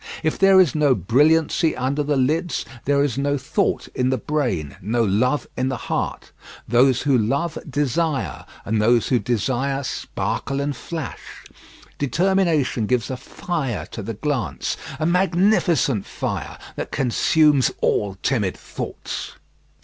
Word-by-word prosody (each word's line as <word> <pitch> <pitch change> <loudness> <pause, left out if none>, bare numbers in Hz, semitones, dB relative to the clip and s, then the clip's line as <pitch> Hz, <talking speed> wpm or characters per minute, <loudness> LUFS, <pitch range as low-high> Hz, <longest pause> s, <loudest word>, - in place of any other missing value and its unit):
If 155 - 0
there 195 -1 +6
is 175 -8 +4
no 145 -4 +3
brilliancy 155 +6 +3
under 135 +3 0
the 145 -1 0
lids, 155 +7 0 0.2
there 140 0 +3
is 140 -2 -1
no 145 +1 +1
thought 130 - -1
in 125 0 0
the 130 - +1
brain, 120 - -2
no 115 +5 +1
love 120 +8 +1
in 130 +1 0
the 130 - -2
heart. - - -3 0.4
Those 125 +2 +4
who 140 -2 +3
love 140 +9 0
desire, 145 +2 -1 0.2
and 110 +1 +1
those 115 +1 +3
who 125 - +3
desire 130 +5 -1
sparkle 135 +1 -3
and 140 0 -1
flash. 160 0 -7 0.6
Determination 160 - +1
gives 125 0 0
a - - -2
fire 135 -1 -4
to 115 - -6
the 110 +2 -5
glance, 140 +1 -2 0.2
a 155 - 0
magnificent 175 - +2
fire - - -4 0.2
that - - -4
consumes 140 +2 +3
all 100 -2 +1
timid 105 -9 0
thoughts. - - -6
135 Hz, 140 wpm, -22 LUFS, 120-155 Hz, 0.6 s, there